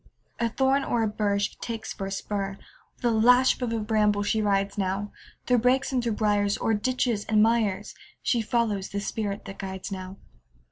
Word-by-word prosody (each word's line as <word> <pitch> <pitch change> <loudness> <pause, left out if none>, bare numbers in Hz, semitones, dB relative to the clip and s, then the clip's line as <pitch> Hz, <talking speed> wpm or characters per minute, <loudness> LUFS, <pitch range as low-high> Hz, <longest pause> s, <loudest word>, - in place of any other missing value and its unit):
A 235 0 +1
thorn 270 +3 +2
or 235 -1 0
a - - +2
bur 210 -1 0
She 200 - -1
takes 225 -2 -5
for 195 - -5
a - - -6
spur; 195 0 -3 0.4
With - - -8
a 240 - +4
lash 245 +4 +4
of 245 -2 -1
a 230 - 0
bramble 210 -1 +2
she 215 +1 +1
rides 200 -1 +1
now, 195 +1 -2 0.3
Through 250 -1 +3
brakes 255 +4 +2
and 255 -2 +1
through 230 -2 0
briars, 205 -1 +1
O'er 225 - 0
ditches 235 -1 0
and 215 -1 +4
mires, 215 -3 +1 0.3
She 235 - +2
follows 215 -4 0
the 200 - -3
spirit 205 0 -3
that 195 0 -9
guides 190 0 -6
now. 185 0 -6
210 Hz, 195 wpm, -26 LUFS, 200-235 Hz, 0.4 s, a